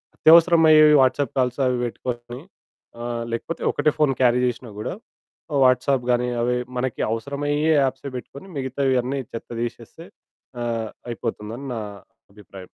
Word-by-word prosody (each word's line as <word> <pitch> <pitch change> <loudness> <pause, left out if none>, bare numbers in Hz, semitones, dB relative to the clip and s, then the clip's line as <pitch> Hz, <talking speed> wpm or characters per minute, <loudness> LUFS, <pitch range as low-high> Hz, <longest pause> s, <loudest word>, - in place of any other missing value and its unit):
అత్యవసరమయ్యేవి 160 -2 +6
WhatsApp 130 0 +1
calls 125 +1 0
అవి 125 -1 0
పెట్టుకొని 120 +1 -6 0.6
ఆహ్, 120 -1 -3
లేకపోతే 140 +8 -4
ఒకటే 150 +1 +1
ఫోను 145 -4 +2
క్యారీ 125 0 +4
చేషినా 120 -2 -4
గూడా 110 - -4 0.7
వాట్సాప్ 130 0 +3
గాని 125 0 +1
అవి 125 +1 +1 0.2
మనకి 125 -1 -2
అవసరమయ్యే 145 +6 -1
యాప్సే 135 +1 -3
బెట్టుకొని 140 +8 -10
మిగతావన్నీ 130 0 -1
చెత్త 115 - -7
దీషేస్తే 120 +8 -7 0.6
ఆహ్, 115 -2 -2 0.2
అయిపోతుందని 115 +3 -5
నా 110 - -3 0.5
అభిప్రాయం. 100 -2 -13
125 Hz, 125 wpm, -23 LUFS, 120-140 Hz, 0.7 s, అత్యవసరమయ్యేవి